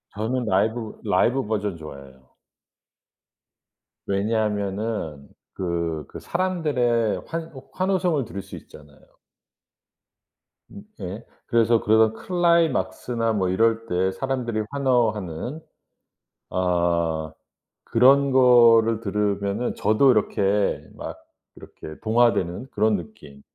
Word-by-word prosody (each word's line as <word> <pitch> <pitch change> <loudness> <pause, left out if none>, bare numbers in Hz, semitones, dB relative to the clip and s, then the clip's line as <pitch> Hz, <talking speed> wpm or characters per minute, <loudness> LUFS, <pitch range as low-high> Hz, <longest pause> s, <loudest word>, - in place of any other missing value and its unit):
저는 120 +4 -2
라이브, 110 +3 -1
라이브 120 +4 +1
버전 105 -4 -2
좋아해요. 70 -4 -12 1.8
왜냐하면은 100 -6 -2 0.3
그 85 -4 -3
그 - - -10
사람들의 145 - 0
환호 160 -5 -7
환호성을 185 -6 0
들을 100 - -7
수 - - -11
있잖아요. 75 -1 -15 1.7
음 200 - -11 0.2
예. 100 +6 -6 0.2
그래서 115 -1 +3
그런 110 +1 +3
클라이막스나 155 - 0
뭐 95 -3 0
이럴 115 +4 +1
때 95 -1 0
사람들이 120 -2 -2
환호하는 120 - -1 0.9
아 85 -3 0 0.5
그런 135 +4 +4
거를 115 -3 +5
들으면은 100 +1 -1
저도 110 +6 +3
이렇게 105 -2 +1
막 - - -7 0.4
이렇게 80 - -11
동화되는 115 -3 +1
그런 105 0 +2
느낌. 80 -8 -12
110 Hz, 225 characters per minute, -23 LUFS, 95-125 Hz, 1.8 s, 거를